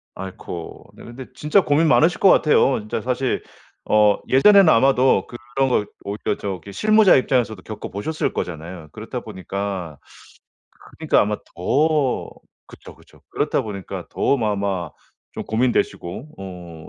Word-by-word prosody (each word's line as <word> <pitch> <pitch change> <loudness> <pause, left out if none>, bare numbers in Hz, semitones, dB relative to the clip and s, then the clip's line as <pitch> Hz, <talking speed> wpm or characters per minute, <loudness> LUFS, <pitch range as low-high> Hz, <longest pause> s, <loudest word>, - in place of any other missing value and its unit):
아이코. 95 -3 -8
네 - - -14
근데 125 +2 -9
진짜 155 +7 +2
고민 155 +2 +2
많으실 165 +3 +3
것 195 - +6
같아요. 145 -6 +4
진짜 105 +1 -4
사실 125 +2 -1 0.4
어 105 -1 +4
예전에는 195 +6 +6
아마도 130 0 +3 0.3
그런 135 -1 +2
거 105 -4 +1 0.2
오히려 100 0 -3
저기 100 0 -6
실무자 215 - +4
입장에서도 120 -6 0
겪어 110 +2 -7
보셨을 150 - -3
거잖아요. 85 -1 -6
그렇다 - - -7
보니까 95 -4 -5 1.0
그니까 - - +2
아마 105 0 0 0.2
더 145 - 0 0.4
그쵸. - - -14
그쵸. - - -22
그렇다 - - 0
보니까 100 -3 -7
더 - - +1
아마 100 -6 -2 0.4
좀 - - -6
고민되시고 115 - -1
어 90 -4 -10
110 Hz, 305 characters per minute, -21 LUFS, 95-135 Hz, 1.0 s, 것